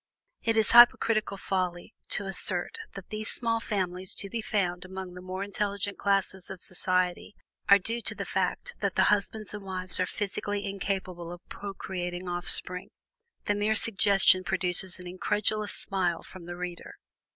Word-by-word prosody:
It 225 -1 +1
is 220 - +4
hypocritical 230 -3 +6
folly 185 0 -2 0.2
to 215 - +2
assert 195 - -2 0.2
that 195 -2 -9
these 215 +1 -3
small 230 -1 0
families 185 -4 -1
to 200 - -4
be 230 - -2
found 180 -5 -1
among 185 -1 -7
the 180 - -9
more 185 +1 -4
intelligent 200 0 -2
classes 195 -2 +1
of 190 -2 -7
society 185 +1 -1 0.3
are 200 - +10
due 230 +5 -3
to - - -1
the - - -4
fact - - -1
that - - -1
the - - +5
husbands 210 +1 -2
and 210 -1 -6
wives 185 -1 -1
are 185 - +2
physically 205 0 -3
incapable 190 -3 -3
of 175 0 -11
procreating 185 -2 -5
off 175 0 -3
spring 180 0 +1 0.6
the 205 - +2
mere 210 +1 +1
suggestion 195 -3 +4
produces 185 0 +1
an 180 - -10
incredulous 210 +3 0
smile 180 -4 -1
from 175 -2 -11
the 175 - -5
reader. 180 -1 -6
195 Hz, 160 wpm, -29 LUFS, 180-205 Hz, 0.6 s, are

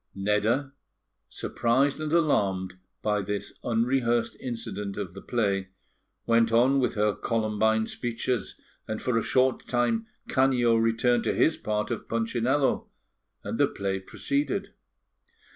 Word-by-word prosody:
Nedda, 105 +8 +1 0.6
surprised 135 +5 +1
and 155 -1 -3
alarmed 100 - +2 0.3
by 105 -1 +1
this 100 +1 -4
unrehearsed 120 0 +1
incident 110 -5 -5
of 95 -4 -4
the 100 - -9
play, 100 -5 0 0.6
went 115 -1 +3
on 125 +4 +4
with 125 - 0
her 105 0 +2
Columbine 110 0 +1
speeches, 120 -2 -3 0.3
and 110 0 -3
for 125 - -1
a 115 - +3
short 130 +2 +1
time 225 - +1 0.2
Canio 125 -3 +3
returned 115 +1 +2
to - - +1
his 160 - +3
part 105 +1 -2
of 115 - -4
Punchinello, 120 +4 +1 0.6
and - - -4
the - - +5
play 95 -1 -3
proceeded. 140 - -2
115 Hz, 125 wpm, -27 LUFS, 105-130 Hz, 0.6 s, the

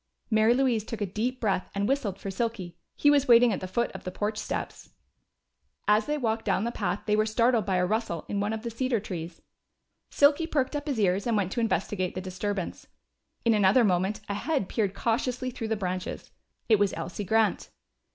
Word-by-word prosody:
Mary 220 +2 +4
Louise 250 -5 +2
took 225 0 -6
a 205 - 0
deep 230 +7 -2
breath 195 -4 0
and 200 +1 0
whistled 235 -8 -1
for 195 - -5
Silky. 195 -4 -3 0.2
He 290 - +4
was 285 -1 +3
waiting 235 -1 +6
at - - -2
the 185 - -5
foot 235 +6 -1
of - - -9
the - - -4
porch 210 +3 -2
steps. - - -5 1.0
As 210 +1 +3
they 300 0 0
walked 225 -4 -1
down 195 -1 +1
the 235 - -1
path - - -2
they 210 - +2
were 215 0 +2
startled 230 -1 +2
by 190 - +1
a 180 0 +2
rustle 210 -5 -2
in 200 - -2
one 205 +1 0
of 220 0 -4
the 235 - -4
cedar 245 0 0
trees. 170 -4 -7 0.7
Silky 290 +3 +4
perked 285 -3 0
up 290 +1 -4
his 270 -6 -1
ears 195 +1 +1
and 230 -2 +2
went 190 -2 0
to 240 - -2
investigate 205 -5 -1
the - - -2
disturbance. 185 +1 -4 0.6
In 230 - +5
another 210 +3 +5
moment 195 +1 +1
a 200 - -2
head 245 - -1
peered 200 -3 -1
cautiously 250 +3 -1
through 235 -2 -5
the 220 - 0
branches. 185 -2 -4 0.4
It 220 -3 +4
was 205 -1 +2
Elsie 180 +4 -4
Grant. 220 +2 +1
215 Hz, 210 wpm, -27 LUFS, 195-240 Hz, 1.0 s, waiting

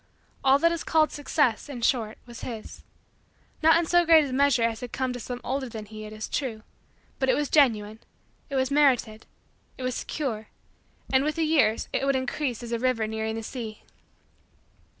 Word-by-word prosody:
All 270 0 +6
that 335 +3 +3
is 335 - -3
called 315 -1 +3
Success, 290 -3 0
in 245 -4 -6
short, 225 -4 +1
was 240 -1 -11
his; 225 -3 -7 0.8
not 320 +1 +6
in 340 - +1
so 350 +2 +4
great 325 -2 +6
a 265 - -5
measure 275 -3 +3
as 230 -1 0
had 245 -2 -7
come 260 -1 -2
to 245 - -6
some 245 +1 -6
older 265 0 -2
than 220 -2 -7
he, 215 0 -9
it 215 - -9
is 215 0 -6
true; 230 -6 -3 0.6
but 265 -1 +1
it - - +4
was 295 -1 -1
genuine; 220 -7 +3 0.5
it 275 - -4
was 260 0 +1
merited; 250 -7 +2 0.5
it 260 - -7
was 255 0 -1
secure; 230 -6 -4 0.7
and, 265 +1 +4
with 305 +1 -1
the 330 - 0
years, 280 -9 +2
it - - 0
would 275 0 +2
increase 260 -1 -2
as 235 - -7
a 235 - -1
river 250 -3 +1
nearing 220 0 -3
the 225 - -5
sea. 220 -3 -7
255 Hz, 195 wpm, -26 LUFS, 225-285 Hz, 0.8 s, All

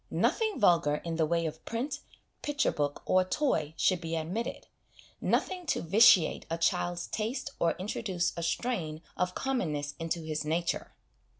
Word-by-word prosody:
Nothing 440 - +1
vulgar 170 -7 +4
in 165 +1 -4
the 160 -2 +2
way 170 +1 +1
of 160 0 -5
print, 265 +5 -3 0.4
picture 295 0 +1
book, 145 -1 -2
or 185 0 +4
toy 185 - 0
should 185 -2 +2
be 165 -1 -3
admitted 175 +9 -3 0.6
nothing 365 -2 0
to - - +1
vitiate 190 -1 +5
a 165 - -1
child's 175 +1 0
taste 230 +6 -3
or 170 -1 +3
introduce 185 -1 -2
a 170 - -4
strain 170 -4 -2
of 180 0 -1
commonness 155 - -1
into 165 +1 -2
his 155 -1 -2
nature. 165 +3 -1
175 Hz, 155 wpm, -30 LUFS, 160-230 Hz, 0.6 s, vitiate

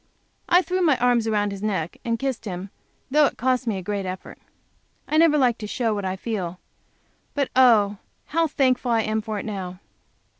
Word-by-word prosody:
I 355 +2 +5
threw 370 +1 -1
my 305 -7 +4
arms 240 -2 +2
around 205 -2 +1
his 200 -1 -7
neck 190 -6 -2
and 230 -1 -1
kissed 265 -2 -3
him, 190 0 -6 0.4
though 300 +1 +5
that - - -2
cost 255 0 0
me 215 -4 0
a 190 - -6
great 200 +1 -2
effort. 185 0 -7 0.7
I 310 - +1
never 320 -2 +5
like 245 -4 +2
to 210 - -5
show 230 0 0
what 205 -2 -3
I 185 0 -1
feel. 185 -4 -4 0.8
But, 280 -2 0
oh! 220 -6 +5 0.3
how 330 +1 +1
thankful 255 -4 +1
I 230 -1 +3
am 215 0 -1
for 215 -1 -4
it - - -5
now. 185 -4 -5
225 Hz, 195 wpm, -24 LUFS, 200-260 Hz, 0.8 s, I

